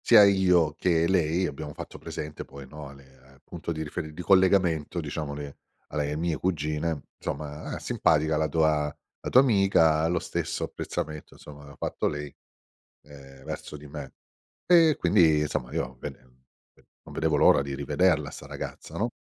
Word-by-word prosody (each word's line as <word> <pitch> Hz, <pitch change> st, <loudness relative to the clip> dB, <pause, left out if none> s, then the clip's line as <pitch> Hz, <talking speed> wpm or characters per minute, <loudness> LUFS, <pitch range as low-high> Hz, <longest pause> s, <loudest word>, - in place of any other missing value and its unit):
Sia 105 Hz, -, +8 dB
io 90 Hz, -5 st, +4 dB
che 85 Hz, -2 st, +2 dB
lei 90 Hz, 0 st, +2 dB
abbiamo 75 Hz, -1 st, -5 dB
fatto -, -, -9 dB
presente 75 Hz, 0 st, -6 dB
poi, 70 Hz, 0 st, -11 dB
no, 75 Hz, +1 st, -9 dB
a 70 Hz, -, -11 dB
le 65 Hz, -1 st, -19 dB
al 65 Hz, -, -23 dB
punto -, -, -6 dB
di 80 Hz, -1 st, -3 dB
riferi 80 Hz, +1 st, -5 dB
di 90 Hz, -, -7 dB
collegamento, 90 Hz, -3 st, +3 dB
diciamo, 75 Hz, -2 st, -4 dB
le 70 Hz, -1 st, -7 dB, 0.3 s
alle 75 Hz, -1 st, -2 dB
mie 80 Hz, 0 st, -1 dB
cugine: 75 Hz, -3 st, -1 dB, 0.2 s
“Somma, 75 Hz, +1 st, -5 dB
ah -, -, -3 dB
simpatica 80 Hz, 0 st, +2 dB
la 80 Hz, 0 st, +1 dB
tua 75 Hz, -1 st, +2 dB, 0.3 s
la -, -, -5 dB
tua 130 Hz, -, +7 dB
amica”. 95 Hz, -, +4 dB
Lo 85 Hz, +1 st, +1 dB
stesso -, -, -3 dB
apprezzamento, 75 Hz, 0 st, -5 dB
insomma, 75 Hz, -1 st, -12 dB
l'ha 70 Hz, 0 st, -13 dB
fatto -, -, -2 dB
lei, 75 Hz, -1 st, -4 dB, 0.7 s
ehm, 70 Hz, -2 st, -14 dB
verso 75 Hz, -, -6 dB
di 75 Hz, -, -12 dB
me. 70 Hz, -2 st, -8 dB, 0.5 s
E 165 Hz, -4 st, +6 dB
quindi, 85 Hz, -4 st, +4 dB
insomma, 75 Hz, -4 st, -2 dB
io 65 Hz, +1 st, -2 dB
bene, 65 Hz, -, -8 dB
n 65 Hz, 0 st, -30 dB, 0.2 s
non -, -, -13 dB
vedevo -, -, +1 dB
l'ora -, -, +6 dB
di 70 Hz, 0 st, -4 dB
rivederla, 75 Hz, +2 st, +1 dB
'sta -, -, -10 dB
ragazza, -, -, -7 dB
no? -, -, 0 dB
75 Hz, 170 wpm, -27 LUFS, 70-85 Hz, 0.7 s, Sia